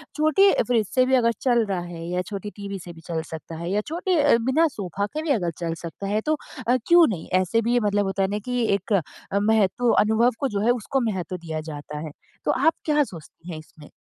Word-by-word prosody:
छोटी 315 +6 +5 0.2
फ्रिज 230 -4 +2
से 255 -1 +5
भी 260 +1 +3
अगर 235 -2 +3
चल 240 -3 +3
रहा 195 -3 -2
है 175 -1 -7
या 180 +1 0
छोटी 200 +1 -6
टीवी 200 -1 -6
से 175 -1 -9
भी 165 - -14
चल 165 -2 -2
सकता 160 0 -7
है 170 +1 -4
या 205 +2 +1
छोटे 345 +2 0
अ, 285 -5 +5
बिना 260 +8 +2
सोफ़ा 200 - -3
के 300 +9 -5
भी 315 - -4
अगर 175 -2 -1
चल 170 -1 -2
सकता 170 +4 -6
है 210 +2 0
तो 310 0 +1 0.3
अ, 245 - +4
क्यों 345 -1 +7
नहीं? 180 -8 -4
ऐसे 185 +5 +2
भी 235 +2 0
ये 245 - +4
मतलब 205 -2 +1
होता 195 0 -1
है - - +2
ना 205 +1 -2
कि 250 -1 -1
एक 200 +2 -1
अ, 195 +2 -2
महत्व 220 +2 +2
अनुभव 220 +3 +3
को 275 - +1
जो 205 -3 -2
है 240 - +5
उसको 250 +3 -1
महत्व 185 -1 -4
दिया 160 -2 -5
जाता 150 0 -7
है 155 0 -6 0.3
तो - - +3
आप 325 - +3
क्या 300 -1 +3
सोचती 170 - -11
हैं 160 - -5
इसमें? 155 -1 -15
205 Hz, 245 wpm, -24 LUFS, 175-250 Hz, 0.3 s, क्यों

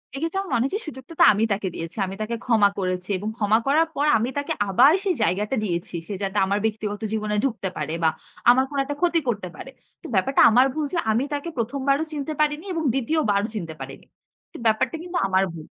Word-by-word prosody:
এক্ষেত্রে 330 +7 -2
আমার 390 - -8
মনে 235 - +2
হয়েছে 385 +10 -2
সুযোগটা 265 +1 -9
তো - - +8
আমি 210 - 0
তাকে 195 -1 -3
দিয়েছি। 165 +5 -7
আমি 190 - -6
তাকে 230 +2 -2
ক্ষমা 220 -5 +4
করেছি 185 -1 -2
এবং 205 +3 -4
ক্ষমা 210 0 +3
করার 315 +4 +4
পর 290 - +1
আমি 230 +3 -1
তাকে 285 - -1 0.2
আবার 255 +10 +6
সেই 380 -4 +1
জায়গাটা 210 +5 0
দিয়েছি। 175 -2 -3
সে 205 - -4
যাতে 195 +1 -2
আমার 200 +2 0
ব্যক্তিগত 210 -1 -2
জীবনে 210 -1 -1
ঢুকতে 230 -8 -1
পারে 155 +1 -3
বা 160 - +5 0.4
আমার 260 +2 +6
কোন 285 - -5
একটা 290 +1 -4
ক্ষতি 345 -2 +3
করতে 205 -6 -1
পারে। 265 - -9 0.3
তো - - -17
ব্যাপারটা 265 +9 +3
আমার 250 +4 +5
ভুল 310 0 -1
যে 345 - 0
আমি 230 +4 +1
তাকে 290 +4 -3
১ম, 245 +4 -2
বারও 275 +3 +3
চিনতে 295 +1 -3
পারিনি 300 +2 +1
এবং 325 -2 -2
২য় 270 +5 0
বারও 200 +2 +1
চিনতে 165 -6 -4
পারিনি। - - -9 0.5
তো - - -8
ব্যাপারটা 220 +8 +2
কিন্তু 355 0 -4
আমার 190 0 +2
ভুল। 160 -2 -9
230 Hz, 220 wpm, -24 LUFS, 200-285 Hz, 0.5 s, তো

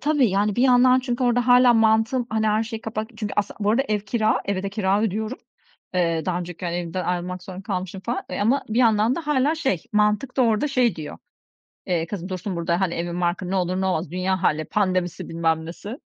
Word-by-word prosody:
tabii, 290 -6 +2
yani 200 +2 +1
bir 245 - +2
yandan 255 0 +5
çünkü 250 0 -2
orada 245 0 +2
hâlâ 250 0 +6
mantığım, 225 +2 +2
hani, 220 0 0
her 215 +1 +2
şeyi 225 0 -6
kapat 220 +1 -5
çünkü 210 -2 -4
aslı 205 -1 0
Bu 205 +1 +2
arada 250 +5 +3
ev 210 -1 +1
kira, 215 +2 0
eve 195 -1 -2
de 200 - -2
kira 200 -1 +1
ödüyorum. 220 +3 -2 0.6
Eee, 165 -3 +1
daha 175 -1 0
önceki, 175 0 -7
hani, 175 0 -2
evden 175 +1 -3
ayrılmak 180 0 -3
zorunda 185 +1 -8
kalmışım 190 -2 -4
falan, 235 +5 -3
eee, - - -3
ama 255 +7 +2
bir 220 +3 -1
yandan 225 0 +3
da 340 - -3
hâlâ 295 +1 +2
şey 265 - -1
mantık 210 +5 +1
da 260 - +4
orada 230 +5 +2
şey 250 -8 +2
diyor, 155 -2 -7 0.7
eee, 170 -2 0
"Kızım, 185 -1 -6
dursun 185 0 -4
burada, 170 +1 0
hani, 185 -3 0
evin 175 +1 -3
barkın. 175 +1 -1
Ne 195 - 0
olur 185 0 0
ne 190 - 0
olmaz, 165 -4 -1
dünya 185 +1 -1
hâli, 155 +1 +1
pandemisi 185 -2 -1
bilmem 160 -1 0
nesi. 200 +6 -7
205 Hz, 220 wpm, -23 LUFS, 180-235 Hz, 0.7 s, hâlâ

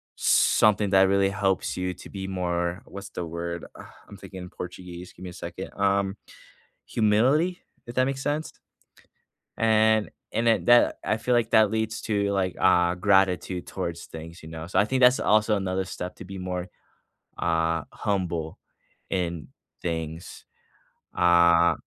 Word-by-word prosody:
something 105 -2 +3
that 95 0 +5
really 100 0 +3
helps 95 -1 0
you 90 0 -2
to - - -12
be 95 -1 -6
more 90 -1 -2
what's 100 0 -9
the 90 - -5
word? 85 +1 -5
Uh, - - -10 0.2
I'm 100 - -11
thinking 95 -1 -9
in 90 - -9
Portuguese, 90 0 -8
give - - -13
me 90 - -6
a - - -12
second. - - -7
Um, 100 0 +1 0.7
humility, 130 +12 +2 0.3
if 120 - -8
that 130 0 +3
makes 135 0 -3
sense? 150 +2 -2 1.1
And 110 -1 +3 0.2
and 115 +1 +1
at 115 - +2
that 120 0 +5
I 110 - 0
feel 120 +3 0
like 115 -2 +1
that 110 -1 +5
leads 110 0 -2
to, 100 -1 +1
like, 95 -2 -1
uh, 90 -1 +4
gratitude 95 -2 +2
towards 85 0 -5
things, 80 +2 -10
you 80 - -10
know. 80 0 -7
So, - - 0
I - - +4
think 130 +1 0
that's 125 +1 +6
also 110 0 +3
another 95 -1 -1
step 90 -1 -7
to - - -10
be 95 0 -8
more, 90 -1 -4 0.7
uh, 80 -1 +1
humble 85 -6 -2 0.5
in 85 -6 -2 0.4
things. 80 -1 -5 0.7
Uh, 85 -1 +5
95 Hz, 160 wpm, -26 LUFS, 85-105 Hz, 1.1 s, that's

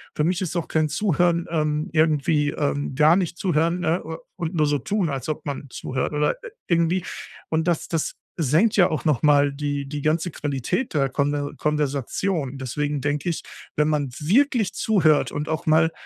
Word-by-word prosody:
Für 150 - +1
mich 180 +3 +1
ist 180 -2 -3
auch 170 -2 -1
kein 155 -1 +1
Zuhören, 175 0 +1
ähm, 155 +1 0
irgendwie 155 -1 +2
ähm, 145 -2 -2
gar 155 +4 +6
nicht 175 -3 -1
zuhören, 170 0 +1
ne, 170 +2 0
u 160 0 -6 0.2
und 175 -1 -4
nur 155 -2 +3
so 145 -1 +1
tun, 200 -6 -1
als 135 +1 -4
ob 155 0 -4
man 140 0 -5
zuhört 130 +3 -3
oder, 150 0 +2
äh, - - -7 0.2
irgendwie. 170 +1 +1 0.4
Und 160 +1 0
das 170 -3 0
das 165 -2 -2 0.2
senkt 165 - +3
ja 180 - +6
auch 155 - -3
noch 150 -7 +2
mal 145 -1 +4
die 145 0 -3
die 145 +1 -5
ganze 160 +3 0
Qualität 145 - -2
der 135 -2 +2
Konver 145 +1 -1
Konversation. 145 +1 -1
Deswegen 145 +3 -2
denke 145 +4 -1
ich, 165 - -3 0.3
wenn 150 0 +2
man 145 -3 0
wirklich 225 - +2
zuhört 165 -9 +3
und 150 +1 -3
auch 160 0 -3
mal 160 +1 +4
155 Hz, 185 wpm, -23 LUFS, 145-170 Hz, 0.4 s, gar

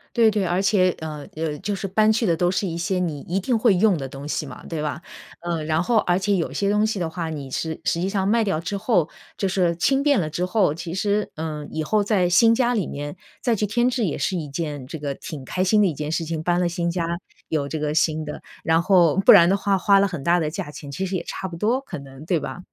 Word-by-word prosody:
对 230 -2 +5
对， 210 -2 0
而 180 +2 +1
且， 190 -2 +3
呃， 150 -2 -6
呃， 155 -2 -3
就 205 - -2
是 195 0 -4
搬 215 +3 +3
去 225 +1 +1
的 170 -4 +2
都 175 +1 +1
是 195 +2 -1
一 165 -1 -4
些 180 +2 -1
你 160 -5 -2
一 185 +3 -2
定 235 +5 0
会 220 -2 +4
用 195 0 +3
的 135 -3 -4
东 140 +1 -8
西 150 - -2
嘛， 135 - -10
对 160 -3 -4
吧？ 150 +2 -3 0.4
呃， 170 -2 -2
然 155 +1 +1
后 230 +5 +2
而 175 -2 +1
且 195 +1 +1
有 170 - -1
些 200 - 0
东 210 +1 +3
西 220 -1 -1
的 170 - -1
话， 165 -1 -4
你 145 -4 -6
是 160 +3 -3
实 170 - 0
际 185 - 0
上 195 -1 0
卖 225 +2 +3
掉 195 -7 0
之 180 +5 -3
后， 195 -6 +1 0.3
就 195 - 0
是 180 -3 +1
轻 270 +11 +2
便 285 -5 +4
了 155 -4 -1
之 175 +4 -2
后， 185 -5 +2
其 165 +1 -6
实， 205 +2 0
呃， 155 -2 -4
以 155 - -2
后 210 +6 +1
在 200 -3 +2
新 225 +6 +5
家 245 0 +2
里 205 -8 0
面 145 +2 -6 0.3
再 240 -3 +1
去 210 - 0
添 240 +4 +2
置 245 -3 0
也 165 - -2
是 185 - -1
一 155 - -4
件 145 -2 -4
这 160 - -6
个 145 -1 -3
挺 145 -4 -8
开 185 +7 -1
心 210 +3 +4
的 200 - +4
一 165 - -1
件 150 +1 -4
事 165 - -1
情。 165 0 -3
搬 175 +1 +1
了 175 -1 +1
新 170 0 -1
家 170 -1 -1 0.4
有 150 -3 -1
这 160 - -4
个 150 0 -1
新 160 -2 +1
的， 150 - -7 0.2
然 160 +1 +3
后 175 -3 +4
不 - - +10
然 175 -3 +8
的 195 - +3
话 200 0 +1
花 200 +1 +4
了 200 - +3
很 175 -8 -6
大 175 +2 +3
的 155 -2 -1
价 150 - -5
钱， 145 -1 -9
其 190 +7 -3
实 190 0 -3
也 170 - -2
差 190 - -5
不 170 -2 -8
多 235 +9 +1
可 275 - -7
能， 135 0 -11
对 175 -1 +1
吧？ - - -6
175 Hz, 300 characters per minute, -23 LUFS, 155-200 Hz, 0.4 s, 不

